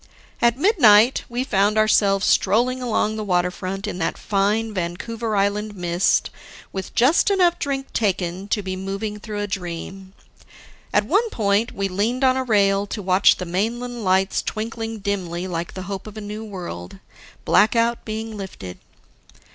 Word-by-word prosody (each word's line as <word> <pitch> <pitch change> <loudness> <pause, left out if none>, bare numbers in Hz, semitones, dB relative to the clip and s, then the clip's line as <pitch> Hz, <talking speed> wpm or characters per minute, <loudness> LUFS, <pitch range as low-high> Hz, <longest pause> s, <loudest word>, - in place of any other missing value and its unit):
At 235 0 +3
midnight 255 - +5
we 245 +1 -2
found 210 -4 +1
ourselves 205 -2 +3
strolling 245 +6 +2
along 220 -3 0
the 215 - -3
waterfront 185 +1 -1
in 210 -3 -4
that 165 - -1
fine, 210 +2 0
Vancouver 215 +5 -3
Island 205 +1 0
mist, 175 0 +1 0.4
with 190 -1 -6
just 270 +11 +4
enough 360 -3 +3
drink 275 -1 -3
taken 190 -2 -1
to 205 0 -1
be 190 0 -3
moving 195 +3 -4
through 210 -1 -5
a - - -1
dream. 190 0 -6 0.8
At 210 - +2
one 415 - +2
point, 210 - 0
we 195 0 -1
leaned 215 +8 -1
on 260 -1 +4
a 260 - 0
rail 200 -4 +2
to 210 - -5
watch 185 0 +4
the 180 - -5
mainland 230 +6 -2
lights 190 0 +2
twinkling 225 +1 -4
dimly 185 -3 -3
like 170 -2 -4
the 185 - -5
hope 195 +1 -6
of 215 0 -10
a - - -5
new 210 +1 -6
world 170 - -7 0.5
blackout 230 +2 +3
being 220 0 -5
lifted. 180 - -8
205 Hz, 155 wpm, -22 LUFS, 190-225 Hz, 0.8 s, midnight